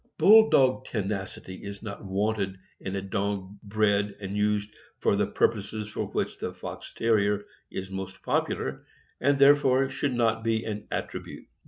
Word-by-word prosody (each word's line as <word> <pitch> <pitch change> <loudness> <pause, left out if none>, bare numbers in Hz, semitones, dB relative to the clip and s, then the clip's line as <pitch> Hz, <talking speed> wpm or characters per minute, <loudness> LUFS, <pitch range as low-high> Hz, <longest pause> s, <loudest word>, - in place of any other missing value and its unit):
Bull 220 +2 +8
dog 130 -1 +4
tenacity 95 -3 -4
is 100 0 -7
not 105 0 -6
wanted 100 0 -1 0.2
in 95 0 -4
a 95 - -2
dog 100 -1 -3
bred 105 -1 +1
and 100 -1 -5
used 105 0 0 0.2
for - - +2
the - - +1
pur - - +3
poses 105 0 -6
for - - -3
which - - -2
the - - -3
Fox - - -7
Terrier 105 -2 +2 0.2
is 95 0 -6
most 95 0 -6
popular, 65 0 -1 0.4
and 140 +2 +3
there 140 +1 +8
fore 135 -1 +2
should 135 -1 -1
not 115 -2 +1
be 115 0 0
an 105 -1 -5
attribute. - - -5
105 Hz, 165 wpm, -27 LUFS, 100-115 Hz, 0.4 s, Bull